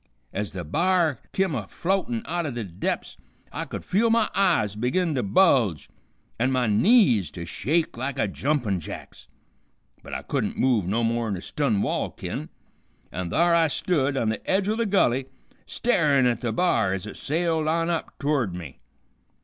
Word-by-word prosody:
Ez 105 Hz, +1 st, -3 dB
the 90 Hz, -2 st, -5 dB
b'ar 165 Hz, -, +1 dB
kim 190 Hz, -4 st, 0 dB
a -, -, -3 dB
floatin' 195 Hz, +6 st, -1 dB
out 175 Hz, -4 st, -2 dB
o' -, -, -2 dB
the 120 Hz, -3 st, -4 dB
dep's 90 Hz, -1 st, -4 dB, 0.3 s
I -, -, -4 dB
could -, -, -7 dB
feel 220 Hz, +5 st, +2 dB
my 225 Hz, -1 st, +2 dB
eyes 170 Hz, -, +2 dB
begin 150 Hz, -, 0 dB
to 130 Hz, -, 0 dB
bulge, 105 Hz, -, +3 dB, 0.5 s
an' 125 Hz, +3 st, +2 dB
my 130 Hz, -1 st, +1 dB
knees 115 Hz, -, +4 dB
to 85 Hz, +3 st, -7 dB
shake 155 Hz, -, -1 dB
like 130 Hz, +2 st, -3 dB
a 110 Hz, -, +1 dB
jumpin' 120 Hz, -4 st, -1 dB
jack's. 80 Hz, -, -9 dB, 0.7 s
But -, -, -7 dB
I -, -, -4 dB
couldn't -, -, -2 dB
move 120 Hz, -8 st, +2 dB
no 115 Hz, +5 st, 0 dB
more'n 115 Hz, -3 st, 0 dB
a -, -, -7 dB
stun 125 Hz, -9 st, 0 dB
wall -, -, -1 dB
kin, -, -, -6 dB, 0.6 s
an' 90 Hz, -2 st, -4 dB
thar 170 Hz, -, +3 dB
I 165 Hz, -1 st, +4 dB
stood 145 Hz, -3 st, 0 dB
on 115 Hz, -4 st, +1 dB
the 110 Hz, -, -3 dB
edge 195 Hz, +1 st, +2 dB
o' 215 Hz, -, +1 dB
the 230 Hz, -1 st, 0 dB
gulley, 135 Hz, -10 st, +2 dB, 0.4 s
starin' 150 Hz, -, +2 dB
at 120 Hz, -2 st, +1 dB
the 120 Hz, -, -1 dB
b'ar 110 Hz, -, +2 dB
ez 95 Hz, -, -6 dB
it 105 Hz, -, -8 dB
sailed 160 Hz, +1 st, 0 dB
on 165 Hz, +2 st, +1 dB
up 165 Hz, -, -4 dB
to'rd 140 Hz, -11 st, 0 dB
me. 80 Hz, -8 st, -8 dB
135 Hz, 180 wpm, -25 LUFS, 105-175 Hz, 0.7 s, knees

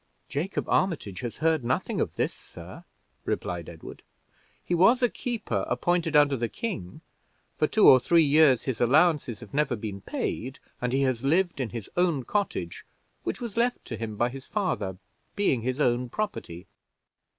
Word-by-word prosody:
"Jacob 170 Hz, +7 st, -2 dB
Armitage 155 Hz, -, 0 dB
has 120 Hz, -2 st, -5 dB
heard 160 Hz, -2 st, +1 dB
nothing 120 Hz, +2 st, -1 dB
of -, -, -2 dB
this, -, -, 0 dB
sir," -, -, -12 dB, 0.4 s
replied 85 Hz, -2 st, -3 dB
Edward. 80 Hz, -2 st, -11 dB, 0.6 s
"He -, -, -1 dB
was 230 Hz, +9 st, +5 dB
a 245 Hz, -, +5 dB
keeper, 215 Hz, -, -3 dB
appointed 165 Hz, +5 st, 0 dB
under 145 Hz, -2 st, +5 dB
the 120 Hz, -2 st, -2 dB
king; 95 Hz, -, -5 dB, 0.5 s
for -, -, +2 dB
two -, -, +4 dB
or 130 Hz, -, +9 dB
three 165 Hz, +7 st, +4 dB
years 145 Hz, -3 st, +5 dB
his 130 Hz, -4 st, -3 dB
allowances 140 Hz, -1 st, +3 dB
have 115 Hz, -, -12 dB
never 145 Hz, -3 st, +1 dB
been 105 Hz, -3 st, -6 dB
paid, 130 Hz, +6 st, -4 dB, 0.2 s
and 125 Hz, 0 st, -1 dB
he 135 Hz, +2 st, +2 dB
has 130 Hz, -2 st, 0 dB
lived 170 Hz, +1 st, +1 dB
on 125 Hz, -, -2 dB
his 115 Hz, -3 st, -6 dB
own 170 Hz, -7 st, +1 dB
cottage, 195 Hz, -, -2 dB, 0.4 s
which -, -, -3 dB
was 235 Hz, -3 st, -6 dB
left 240 Hz, +1 st, 0 dB
to -, -, -5 dB
him 110 Hz, -2 st, -5 dB
by 120 Hz, +3 st, +1 dB
his 130 Hz, +1 st, -10 dB
father, 155 Hz, -, -2 dB, 0.4 s
being 195 Hz, -, +1 dB
his 130 Hz, +4 st, -2 dB
own 125 Hz, -2 st, +1 dB
property." 120 Hz, -, -4 dB
135 Hz, 170 wpm, -27 LUFS, 120-175 Hz, 0.6 s, or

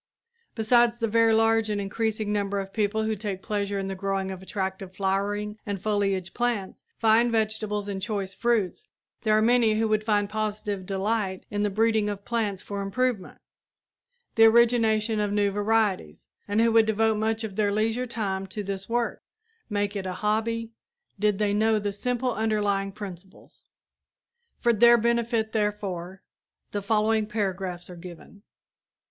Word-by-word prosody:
Besides 235 Hz, +1 st, +3 dB
the 230 Hz, -1 st, 0 dB
very 225 Hz, +1 st, +4 dB
large 225 Hz, 0 st, +3 dB
and 210 Hz, -1 st, -1 dB
increasing 215 Hz, +1 st, -2 dB
number 200 Hz, -1 st, -1 dB
of 195 Hz, 0 st, -6 dB
people 215 Hz, 0 st, 0 dB
who 220 Hz, 0 st, 0 dB
take 195 Hz, -2 st, -5 dB
pleasure 205 Hz, -1 st, -2 dB
in 195 Hz, -, -2 dB
the 195 Hz, -, -3 dB
growing 195 Hz, 0 st, -2 dB
of 190 Hz, -1 st, -7 dB
attractive 190 Hz, -1 st, -4 dB
flowering 205 Hz, +2 st, -1 dB
and 200 Hz, -2 st, -4 dB
foliage 195 Hz, -2 st, -1 dB
plants, 240 Hz, -6 st, -2 dB
fine 225 Hz, +2 st, +4 dB
vegetables 215 Hz, -2 st, -1 dB
and 195 Hz, -1 st, -4 dB
choice 200 Hz, -2 st, -3 dB
fruits, 235 Hz, -, 0 dB, 0.3 s
there 215 Hz, -1 st, +3 dB
are 215 Hz, -, +3 dB
many 230 Hz, -2 st, +4 dB
who 225 Hz, 0 st, +2 dB
would 215 Hz, 0 st, +1 dB
find 205 Hz, -2 st, +1 dB
positive 210 Hz, -2 st, -3 dB
delight 195 Hz, -1 st, -1 dB
in 205 Hz, 0 st, -1 dB
the 205 Hz, -, +1 dB
breeding 220 Hz, +1 st, +2 dB
of 200 Hz, -1 st, -6 dB
plants 215 Hz, -5 st, -2 dB
for 200 Hz, -1 st, -4 dB
improvement 210 Hz, 0 st, -1 dB, 1.0 s
the 225 Hz, -, +6 dB
origination 225 Hz, -1 st, +4 dB
of 205 Hz, -1 st, 0 dB
new 205 Hz, -1 st, +2 dB
varieties 205 Hz, -, 0 dB, 0.2 s
and 205 Hz, +2 st, +2 dB
who 230 Hz, 0 st, +4 dB
would 225 Hz, -1 st, +5 dB
devote 220 Hz, 0 st, +2 dB
much 220 Hz, +1 st, 0 dB
of 210 Hz, -3 st, -5 dB
their 205 Hz, -1 st, +1 dB
leisure 225 Hz, +4 st, 0 dB
time 195 Hz, -5 st, -3 dB
to 205 Hz, +2 st, -5 dB
this 195 Hz, +1 st, -5 dB
work 235 Hz, 0 st, -1 dB, 0.5 s
make 205 Hz, -1 st, -1 dB
it 190 Hz, -2 st, -3 dB
a 185 Hz, -, -3 dB
hobby 225 Hz, +3 st, -1 dB, 0.5 s
did 210 Hz, -1 st, +2 dB
they 205 Hz, -1 st, +1 dB
know 220 Hz, +1 st, +3 dB
the 205 Hz, -1 st, -2 dB
simple 245 Hz, +3 st, -1 dB
underlying 205 Hz, -3 st, 0 dB
principles. 190 Hz, -2 st, -11 dB, 0.9 s
For 235 Hz, -1 st, +3 dB
their 235 Hz, +2 st, +7 dB
benefit, 235 Hz, -1 st, 0 dB
therefore, 195 Hz, -4 st, -3 dB, 0.5 s
the 205 Hz, -, -2 dB
following 215 Hz, +1 st, +1 dB
paragraphs 190 Hz, -4 st, -3 dB
are 180 Hz, -, -9 dB
given. 180 Hz, +3 st, -12 dB
210 Hz, 160 wpm, -26 LUFS, 195-225 Hz, 1.0 s, their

